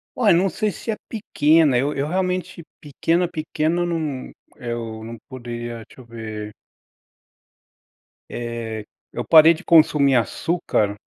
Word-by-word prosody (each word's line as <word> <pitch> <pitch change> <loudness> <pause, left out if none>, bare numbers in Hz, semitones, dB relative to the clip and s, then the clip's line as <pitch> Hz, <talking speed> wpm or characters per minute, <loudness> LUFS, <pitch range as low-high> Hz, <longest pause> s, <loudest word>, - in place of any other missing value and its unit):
Olha, 215 -7 +4
eu - - +4
não 190 +2 +2
sei 210 +5 -1
se 225 - -5
é - - -2
pequena, 160 - +3
eu 140 +4 0
eu 140 +2 -2
realmente 180 -1 -2 0.2
pequena, 165 +4 0
pequena, 165 +1 -1
não 155 -6 -3 0.2
Eu 115 -3 -5
não 115 +1 -8
poderia 120 -2 -6
Deixa 130 - -15
eu - - -16
ver. 110 -2 -7 1.8
Eh, 115 -2 -5 0.3
eu 120 - -5
parei 160 +1 +8
de 170 - -12
consumir 150 -5 +5
açúcar 115 - 0
145 Hz, 135 wpm, -22 LUFS, 120-170 Hz, 1.8 s, parei